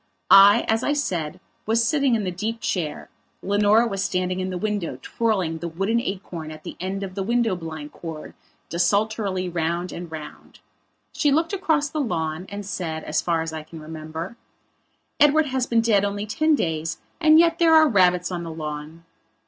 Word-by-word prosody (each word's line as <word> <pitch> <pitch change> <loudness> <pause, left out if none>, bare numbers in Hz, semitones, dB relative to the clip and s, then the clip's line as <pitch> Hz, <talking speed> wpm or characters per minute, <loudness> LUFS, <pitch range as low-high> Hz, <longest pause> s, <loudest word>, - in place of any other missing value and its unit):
I, 200 +3 +8
as 225 +1 +2
I 290 - +1
said, 180 - -2 0.3
was 225 +1 +2
sitting 275 -4 +2
in 215 - -1
the 185 - -2
deep 220 +6 -3
chair, 165 -9 -3 0.4
Leonora 205 +3 +4
was 195 -4 -2
standing 180 0 -1
in 185 0 -2
the 185 - -3
window 205 -8 -2
twirling 190 -8 -1
the 170 - -4
wooden 195 +8 0
acorn 180 -6 -5
at 155 0 -10
the - - -7
end 190 +2 -3
of 190 -1 -6
the 195 - -3
window 230 0 +1
blind 160 -3 -7
cord 160 -2 -8 0.3
desultorily 200 +1 0
round 170 +1 -2
and 170 -1 -7
round. 155 -2 -10 0.5
She 295 -3 +2
looked 325 +6 +1
across 320 -7 +1
the 305 0 -3
lawn 165 - -2
and 200 0 -6
said, 160 -5 -4
as - - 0
far 165 -2 0
as 165 0 -6
I 160 - -4
can 160 +1 -11
remember: 160 +6 -7 0.8
"Edward 300 +2 +5
has 260 -2 -1
been 230 -1 +3
dead 215 -3 +3
only 205 +1 -2
ten 310 +9 +2
days 165 - -2 0.2
and 315 -1 +6
yet 335 0 +4
there 330 -1 +6
are 315 0 +7
rabbits 180 -6 +3
on 175 -1 -3
the 170 - -6
lawn." 155 +1 -7
190 Hz, 185 wpm, -23 LUFS, 165-230 Hz, 0.8 s, I